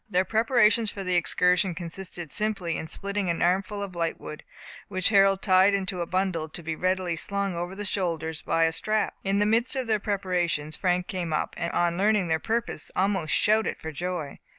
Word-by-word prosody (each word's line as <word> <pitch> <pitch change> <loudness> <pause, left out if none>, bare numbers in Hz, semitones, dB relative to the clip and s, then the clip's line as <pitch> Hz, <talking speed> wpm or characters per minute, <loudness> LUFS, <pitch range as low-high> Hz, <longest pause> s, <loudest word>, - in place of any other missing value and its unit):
Their 185 -1 +2
preparation 225 0 +3
for 200 -1 -2
the 185 -1 -1
excursion 180 +1 +2
consisted 175 -1 -6
simply 200 -6 -1
in 160 - -4
splitting 200 +2 -2
an 170 - 0
armful 195 +3 0
of 195 -2 -6
lightwood, 165 -2 -4 0.5
which 185 -1 0
Harold 195 -2 +4
tied 190 +1 +5
into 190 -2 -2
a 170 - -2
bundle, 185 -4 -1
to 170 - -8
be 160 0 -3
readily 185 0 0
slung 200 +3 -2
over 175 +2 -4
the 205 +1 -5
shoulders 165 -5 -2
by 165 - +1
a 165 - +3
strap. 215 +6 0
In 195 +1 +1
the 205 - +3
midst 230 +5 +2
of 260 -1 -1
their 220 -2 +1
preparations 180 -7 -1
Frank 180 0 0
came 180 -4 -4
up, 155 - -1
and 170 - -3
on 175 0 +1
learning 205 -3 +2
their 160 0 +2
purpose, 225 -7 -2
almost 190 -4 +1
shouted 220 -1 +2
for 160 - -6
joy. 170 -2 -4
185 Hz, 195 wpm, -26 LUFS, 170-200 Hz, 0.5 s, tied